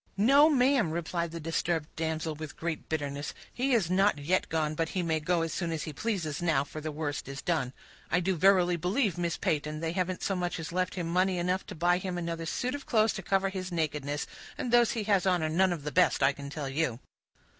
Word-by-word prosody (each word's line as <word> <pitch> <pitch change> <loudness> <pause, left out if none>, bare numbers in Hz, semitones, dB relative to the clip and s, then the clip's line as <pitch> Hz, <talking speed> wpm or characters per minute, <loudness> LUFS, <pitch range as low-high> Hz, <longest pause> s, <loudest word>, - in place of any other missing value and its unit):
"No, 275 +9 +6
ma'am," 265 - +3
replied 170 +1 -2
the 165 +1 -6
disturbed 165 0 -1
damsel, 160 0 -2
with 155 0 -8
great 165 -1 -4
bitterness, 145 -2 -3 0.2
"he 260 +2 0
is 195 -8 +2
not 195 -2 +3
yet 165 +6 0
gone, 155 -1 0
but 165 +1 -1
he 185 - -1
may 160 -2 +1
go 165 +2 +1
as 165 -1 -3
soon 170 -2 -2
as 160 -2 -2
he 155 - -5
pleases 175 -6 -2
now, 160 -6 +2
for 155 +2 -8
the 155 0 -3
worst 150 -1 -3
is 135 0 -6
done. 155 -8 0 0.4
I 175 - +3
do 185 +1 0
verily 180 0 +4
believe, 185 - 0
Miss 170 -1 -1
Peyton, 150 0 -1
they 165 0 -2
haven't 185 0 -2
so 195 - 0
much 180 -1 -2
as 165 0 -5
left 185 +1 -1
him 175 -3 -2
money 185 +2 +2
enough 180 +2 -1
to - - -7
buy 175 +2 +2
him 185 -1 -4
another 165 -1 -3
suit 250 +8 -1
of 285 -1 -6
clothes 220 -1 +3
to - - -5
cover 195 0 +1
his 185 -1 -5
nakedness, 150 -3 -2 0.3
and 245 - -3
those 240 -1 +5
he 225 - -2
has 195 -3 +2
on 180 -3 +2
are 155 - 0
none 185 +4 +3
of 165 -5 -3
the 150 - -3
best, 135 - +3
I 135 - +5
can 140 0 -8
tell 145 -1 -4
you." 135 -4 -1
170 Hz, 235 wpm, -29 LUFS, 155-190 Hz, 0.4 s, No